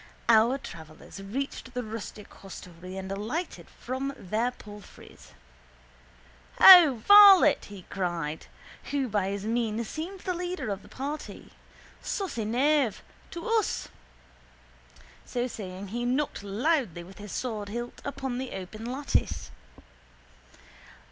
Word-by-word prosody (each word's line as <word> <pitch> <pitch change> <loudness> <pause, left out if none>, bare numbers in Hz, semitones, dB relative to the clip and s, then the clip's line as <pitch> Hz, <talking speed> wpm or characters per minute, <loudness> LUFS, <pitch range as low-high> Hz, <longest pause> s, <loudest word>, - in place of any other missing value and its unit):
Our 230 +3 +5
travellers 160 - -11
reached 260 +4 -5
the 250 - -2
rustic 215 -1 -8
hostelry 180 -1 -10
and 190 0 -6
alighted 225 - -4
from 265 +2 -5
their 215 +6 -1
palfreys. 210 -4 -14 1.3
—Ho, 320 -11 +9
varlet! 400 -6 +8 0.2
cried 170 -5 -3 0.3
he, - - -12
who 270 -2 0
by 205 -3 0
his 200 0 -4
mien 230 0 -1
seemed 350 - -6
the 365 - -2
leader 355 - -4
of 200 0 -4
the - - -16
party. 290 +3 -7 0.5
Saucy 340 - -3
knave! 260 +1 +1 0.3
To 340 0 -7
us! 450 -3 0 1.3
So 245 0 -2
saying 195 -5 -7
he 240 +4 -3
knocked 260 +2 -1
loudly 205 - -1
with 190 +3 -14
his 205 -1 -9
swordhilt 235 0 -5
upon 270 -3 -4
the 260 -1 -5
open 215 +5 -7
lattice. 275 +2 -2
235 Hz, 115 wpm, -28 LUFS, 200-280 Hz, 1.3 s, Ho